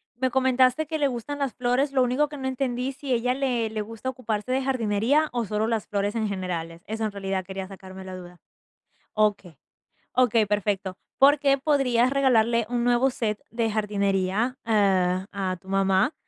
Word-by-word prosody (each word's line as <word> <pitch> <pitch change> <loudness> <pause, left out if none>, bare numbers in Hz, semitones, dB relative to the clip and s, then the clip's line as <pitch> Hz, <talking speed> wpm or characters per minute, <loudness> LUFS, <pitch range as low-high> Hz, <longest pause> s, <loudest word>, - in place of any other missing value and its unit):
me 260 +1 0
comentaste 260 +3 +3
que 315 0 -2
le 285 -2 +2
gustan 270 +3 -5
las 275 -3 -1
flores, 250 +3 0
lo 260 - +3
único 255 +5 +1
que 295 0 -9
no 265 -1 -4
entendí, 260 0 -2
si 275 -1 -3
ella 245 +1 +1
le 250 -4 0
le 215 -1 -3
gusta 225 +4 -5
ocuparse 245 -3 -3
de 265 +1 +1
jardinería 255 +4 +1
o 240 -2 -1
solo 210 +2 -1
las 225 -2 -1
flores 205 +1 -1
en 220 -2 0
generales. 170 -4 -4
Eso 220 +1 -2
en 215 - -2
realidad 195 -2 -3
quería 190 0 -6
sacarme 190 -1 -10
la 185 0 -7
duda. 175 -1 -11 0.7
Okey. 205 -7 0 0.6
Okey, 235 -4 +3
perfecto. 200 -2 -1 0.2
Porque 275 0 +5
podrías 260 -4 +2
regalarle 235 -4 +3
un 240 -1 -1
nuevo 245 +2 +3
set 215 -4 -2
de 230 -1 -1
jardinería, 205 +2 0
eh, 190 -4 +2
a 190 -2 -2
tu 190 - -18
mamá. 195 +7 +2
230 Hz, 175 wpm, -25 LUFS, 200-260 Hz, 0.7 s, Porque